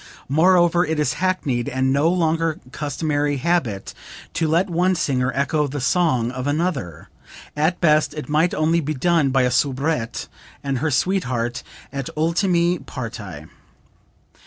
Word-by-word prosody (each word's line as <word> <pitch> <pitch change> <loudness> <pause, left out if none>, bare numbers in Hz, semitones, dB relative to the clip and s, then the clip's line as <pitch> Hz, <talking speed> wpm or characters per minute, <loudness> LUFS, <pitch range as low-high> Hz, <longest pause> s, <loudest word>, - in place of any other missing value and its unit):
Moreover 175 +3 +4
it 160 -2 -1
is 150 - +1
hackneyed 145 -10 0
and 130 +1 +1
no 145 +4 +3
longer 165 -2 0
customary 145 0 -1
habit 130 - -1 0.4
to 165 - 0
let 170 +5 +2
one 180 +1 +1
singer 130 -6 0
echo 150 +2 +1
the 145 +1 -4
song 130 -5 +1
of 130 +1 -4
another. 145 - -2 0.5
At 155 +4 +1
best 155 -2 +3
it 150 - -6
might 155 +4 +2
only 160 +2 +2
be 155 -1 -2
done 160 0 +2
by 130 -1 +2
a 125 - +1
soubrette 135 -1 -1 0.4
and 135 -2 -1
her 160 - 0
sweetheart 125 -6 0 0.3
at 140 -2 -4
ultime 170 +1 +1
parti." 105 - -7
150 Hz, 140 wpm, -21 LUFS, 130-170 Hz, 0.5 s, Moreover